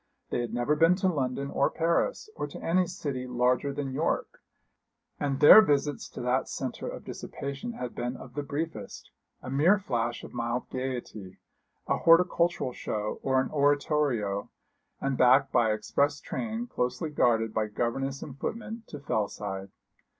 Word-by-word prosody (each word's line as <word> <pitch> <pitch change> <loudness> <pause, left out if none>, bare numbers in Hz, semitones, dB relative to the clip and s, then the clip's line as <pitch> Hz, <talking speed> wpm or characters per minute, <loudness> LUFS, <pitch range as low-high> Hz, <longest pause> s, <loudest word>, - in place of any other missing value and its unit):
They - - 0
had 120 -2 -3
never 120 +5 +1
been 165 +3 +5
to 190 0 0
London 140 -4 -1
or - - +2
Paris, 170 - 0
or - - -3
to - - -9
any 180 +2 +2
city 140 -7 -4
larger 125 +2 +1
than 140 -1 -4
York; 155 +5 -1 0.8
and 140 -2 -1
their 150 +8 +11
visits 145 -6 0
to - - -8
that 125 +2 0
centre 130 -2 -4
of - - -7
dissipation 140 - -6
had 125 - -5
been 120 +1 -3
of - - -11
the 145 - -2
briefest, 155 +3 -5 0.3
a 130 - -6
mere 160 +9 +4
flash 120 - -2
of - - -10
mild 120 +1 -2
gaiety, 120 -7 -5 0.5
a - - +1
horticultural 170 -4 +3
show 105 -2 -3
or 130 -1 +2
an 130 - -1
oratorio, 140 - +1 0.5
and 135 -1 -2
back 130 +2 +5
by 115 -3 +3
express 140 +7 0
train, 230 +1 -4
closely 155 - -2
guarded 115 -5 +2
by 110 -1 0
governess 135 +5 -2
and 140 -2 -10
footmen, 225 +4 -4
to 150 - -8
Fellside. 100 -6 -3
135 Hz, 155 wpm, -28 LUFS, 120-155 Hz, 0.8 s, their